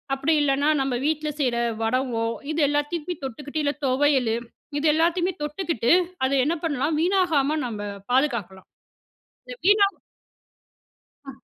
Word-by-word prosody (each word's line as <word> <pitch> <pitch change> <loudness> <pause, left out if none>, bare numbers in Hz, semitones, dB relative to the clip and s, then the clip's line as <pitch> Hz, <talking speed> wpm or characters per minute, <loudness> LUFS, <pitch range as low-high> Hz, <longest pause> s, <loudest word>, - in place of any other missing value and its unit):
அப்படி 275 +4 +1
இல்லன்னா, 280 +1 +2
நம்ப 270 -2 -1
வீட்ல 305 0 0
செய்ற 250 -3 +1 0.3
வடகோம் 230 -1 0 0.2
இது 315 - -2
எல்லாத்தையுமே 295 +4 -2
தொட்டுக்கிட்டு, 285 +4 -4
இல்ல 285 0 +1
தொவையலு, 260 -3 +2 0.4
இது 310 - +1
எல்லாத்தையுமே 345 +3 +1
தொட்டுக்கிட்டு, 300 - -1 0.3
அத 260 - 0
என்ன 335 +4 0
பண்ணலாம் 295 +1 0
வீணாகாம 330 -6 +2
நம்ப 205 -2 -5 0.2
பாதுகாக்கலாம். 235 -9 0 0.8
இத - - -6
வீணா 410 -1 +6 1.4
அ. - - -6
290 Hz, 120 wpm, -24 LUFS, 255-320 Hz, 1.4 s, வீணா